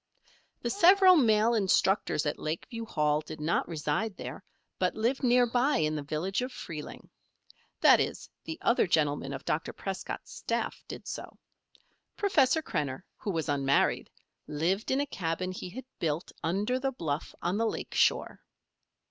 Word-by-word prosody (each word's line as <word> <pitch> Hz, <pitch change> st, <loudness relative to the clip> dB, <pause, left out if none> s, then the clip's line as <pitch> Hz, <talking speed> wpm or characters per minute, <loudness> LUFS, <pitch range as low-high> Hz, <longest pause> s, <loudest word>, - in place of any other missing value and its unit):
The -, -, 0 dB
several 380 Hz, 0 st, +7 dB
male 225 Hz, -5 st, +4 dB
instructors 195 Hz, -5 st, +2 dB
at 150 Hz, -, -2 dB
Lakeview 225 Hz, +9 st, -4 dB
Hall 150 Hz, -7 st, +1 dB
did 155 Hz, 0 st, -9 dB
not 155 Hz, +3 st, 0 dB
reside 165 Hz, +6 st, -2 dB
there, -, -, -7 dB, 0.4 s
but -, -, +1 dB
lived 235 Hz, +5 st, 0 dB
near 245 Hz, -1 st, +5 dB
by 245 Hz, +5 st, +2 dB
in 155 Hz, -1 st, +1 dB
the 150 Hz, -, -2 dB
village 155 Hz, -, -2 dB
of 250 Hz, +1 st, -3 dB
Freeling. 155 Hz, -9 st, -8 dB, 0.7 s
That -, -, +7 dB
is, -, -, -2 dB, 0.2 s
the 320 Hz, -, -5 dB
other 235 Hz, -, +3 dB
gentlemen 145 Hz, -4 st, +1 dB
of 135 Hz, -1 st, -6 dB
Dr. 155 Hz, -, -1 dB
Prescott's 195 Hz, -1 st, -6 dB
staff -, -, -3 dB
did -, -, -8 dB
so. -, -, -7 dB, 0.8 s
Professor 320 Hz, -7 st, +3 dB
Krenner, 145 Hz, -, -3 dB
who -, -, -6 dB
was 165 Hz, -4 st, -1 dB
unmarried, 140 Hz, -2 st, +1 dB, 0.4 s
lived 175 Hz, +8 st, -1 dB
in 265 Hz, -, +2 dB
a -, -, 0 dB
cabin 185 Hz, -, -3 dB
he 185 Hz, -1 st, -6 dB
had 250 Hz, +8 st, -8 dB
built 160 Hz, 0 st, -2 dB
under 205 Hz, +9 st, 0 dB
the 270 Hz, 0 st, -1 dB
bluff 160 Hz, -, -4 dB
on 180 Hz, +3 st, -1 dB
the 225 Hz, +1 st, +1 dB
lake -, -, -4 dB
shore. -, -, +2 dB
190 Hz, 155 wpm, -29 LUFS, 155-245 Hz, 0.8 s, several